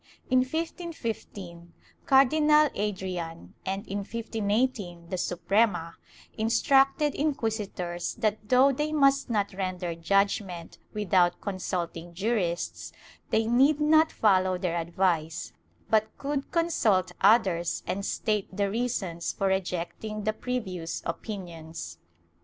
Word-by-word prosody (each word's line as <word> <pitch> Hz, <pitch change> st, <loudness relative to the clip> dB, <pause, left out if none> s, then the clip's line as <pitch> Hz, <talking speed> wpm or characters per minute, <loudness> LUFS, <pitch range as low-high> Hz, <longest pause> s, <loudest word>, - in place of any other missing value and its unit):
In 255 Hz, -, +6 dB
1515, 235 Hz, -, -4 dB, 0.3 s
Cardinal 300 Hz, +3 st, +5 dB
Adrian, 185 Hz, -5 st, -4 dB
and 195 Hz, +1 st, -3 dB
in 200 Hz, +1 st, -3 dB
1518 210 Hz, -4 st, -2 dB
the 185 Hz, -, -2 dB
Suprema, 180 Hz, -1 st, +1 dB, 0.4 s
instructed 270 Hz, +5 st, +3 dB
inquisitors 210 Hz, -, -2 dB
that 215 Hz, -2 st, -1 dB
though 260 Hz, +2 st, +6 dB
they 300 Hz, +3 st, -2 dB
must 275 Hz, -3 st, +3 dB
not 205 Hz, -3 st, 0 dB
render 185 Hz, -2 st, -3 dB
judgement 185 Hz, 0 st, 0 dB
without 185 Hz, -4 st, +2 dB
consulting 175 Hz, -3 st, -4 dB
jurists, 190 Hz, -4 st, -1 dB, 0.4 s
they 225 Hz, -, +2 dB
need 270 Hz, +6 st, +4 dB
not 315 Hz, +1 st, +4 dB
follow 185 Hz, -3 st, +3 dB
their 180 Hz, -2 st, -1 dB
advice, 170 Hz, -1 st, -1 dB, 0.3 s
but 220 Hz, 0 st, +1 dB
could 280 Hz, 0 st, -3 dB
consult 250 Hz, -, +2 dB
others 190 Hz, -5 st, +3 dB
and 200 Hz, +2 st, -2 dB
state 210 Hz, 0 st, -1 dB
the 200 Hz, +1 st, -1 dB
reasons 200 Hz, -8 st, -2 dB
for 195 Hz, -, 0 dB
rejecting 190 Hz, +3 st, -3 dB
the 215 Hz, +1 st, 0 dB
previous 190 Hz, -9 st, -4 dB
opinions. 165 Hz, -, -6 dB
200 Hz, 105 wpm, -28 LUFS, 175-245 Hz, 0.4 s, In